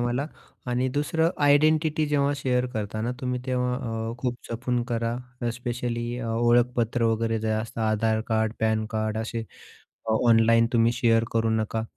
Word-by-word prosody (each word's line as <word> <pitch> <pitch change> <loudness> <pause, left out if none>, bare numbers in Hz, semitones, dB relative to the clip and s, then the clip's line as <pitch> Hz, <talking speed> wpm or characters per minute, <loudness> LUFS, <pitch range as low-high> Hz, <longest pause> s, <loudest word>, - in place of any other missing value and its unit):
मला 120 +4 -1 0.4
आणि 125 +1 +1
दुसरं 160 +5 +1
आयडेंटिटी 155 +2 +3
जेव्हा 145 -1 +1
शेअर 125 -2 0
करताना 110 +2 -2
तुम्ही 125 -1 -2
तेव्हा, 125 -1 0 0.4
अ, - - -5
खूप 120 -1 -2
जपून 120 +1 -1
करा 115 0 -1 0.4
स्पेशली 120 -1 -3
अ, 115 - -4
ओळखपत्र 120 0 +2
वगैरे 115 0 +1
जे 110 - -2
असतं 110 +1 -3
आधार 110 0 +1
कार्ड, 110 -1 +1
पॅन 110 0 +1
कार्ड 110 0 -1
असे 115 0 -3 0.7
ऑनलाईन 115 0 +4
तुम्ही 115 0 +3
शेअर 115 -2 +2
करू 115 0 +1
नका 110 0 -1
115 Hz, 145 wpm, -25 LUFS, 110-125 Hz, 0.7 s, ऑनलाईन